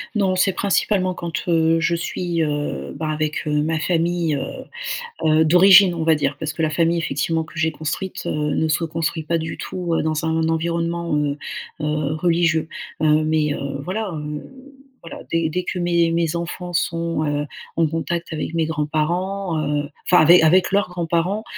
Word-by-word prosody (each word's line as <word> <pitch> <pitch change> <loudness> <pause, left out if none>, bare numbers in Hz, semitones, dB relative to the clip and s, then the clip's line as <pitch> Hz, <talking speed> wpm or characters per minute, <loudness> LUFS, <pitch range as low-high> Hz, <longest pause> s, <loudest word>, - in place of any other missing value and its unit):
Non, 190 -3 +2
c'est 190 +1 +3
principalement 190 -2 +1
quand, 170 0 -5
heu, 165 -1 +3
je 170 0 +1
suis, 170 0 -2
heu, 145 - -3
bah 155 +1 -3
avec, 155 +1 -2
heu, 150 0 +1
ma 160 0 0
famille, 170 -2 0
heu, - - -2 0.8
heu, 155 +1 +4
d'origine, 185 +2 +7
on 165 -1 -3
va 160 -1 +4
dire 145 - -1
parce 155 -1 -2
que 165 - -4
la 155 - +2
famille 165 +1 +1
effectivement 160 +1 -1
que 160 - -14
j'ai 160 0 +1
construite, 160 +5 -4
heu, - - -1
ne 150 +1 0
se 160 +2 0
construit 160 0 -2
pas 165 +2 0
du 160 0 -5
tout, 175 -2 -4
heu, - - 0
dans 155 0 -1
un 160 0 +1
environnement, 170 0 -1
heu, 145 -1 0 0.4
heu, 150 -1 -1
religieux. 165 -1 +1 0.3
Heu, 155 0 +4
mais, 155 -1 +1
heu, 140 -1 -4
voilà, 200 +2 -3
heu, 150 -1 -5 0.6
voilà, 165 - -9
dès 165 -1 +1
dès 180 +3 -2
que 180 - -3
mes 170 -1 +2
mes 165 -1 0
enfants 175 +1 -5
sont, 165 -2 -1
heu, 145 0 -1 0.3
en 165 -1 +3
contact 165 +2 -3
avec 155 +1 -4
mes 165 -1 +2
grands-parents, 165 +4 -1
heu, 145 0 -1 0.2
enfin 180 -3 +6
ave 165 - +6
avec 180 +4 +4
leurs 200 -2 +2
grands-parents, 175 +4 -1
165 Hz, 185 wpm, -21 LUFS, 155-175 Hz, 0.8 s, d'origine